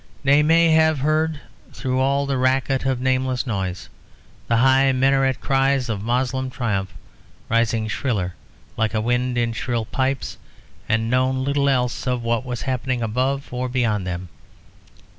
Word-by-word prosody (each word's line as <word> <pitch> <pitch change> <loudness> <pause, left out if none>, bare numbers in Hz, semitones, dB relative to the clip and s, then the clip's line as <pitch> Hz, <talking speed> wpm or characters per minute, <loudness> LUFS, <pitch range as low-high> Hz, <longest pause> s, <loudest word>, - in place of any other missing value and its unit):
They 140 +2 +5
may 165 +2 +4
have 160 -1 +4
heard 155 +2 0 0.3
through 130 -1 -2
all 140 +1 +1
the 135 -2 -1
racket 130 +1 +1
of 130 -2 0
nameless 130 0 0
noises 95 -6 -3 0.6
the 115 - +2
high 135 +2 +4
minaret 135 0 +2
cries 135 -1 +1
of 105 -3 -2
Moslem 130 +3 -1
triumph 100 -7 -2 0.6
rising 115 -1 +1
shriller 105 -6 -2 0.4
like 110 0 0
a - - +2
wind 120 +2 0
in 115 -1 0
shrill 115 0 -2
pipes, 130 +3 -2 0.5
and 110 +1 +1
known 130 +1 +1
little 140 0 +1
else 125 -1 0
of 125 -2 -1
what 115 +1 0
was 125 -2 -5
happening 130 -2 -2
above 130 +5 -1
or 125 +1 -2
beyond 110 -6 0
them. 90 0 -5
130 Hz, 150 wpm, -22 LUFS, 115-135 Hz, 0.6 s, They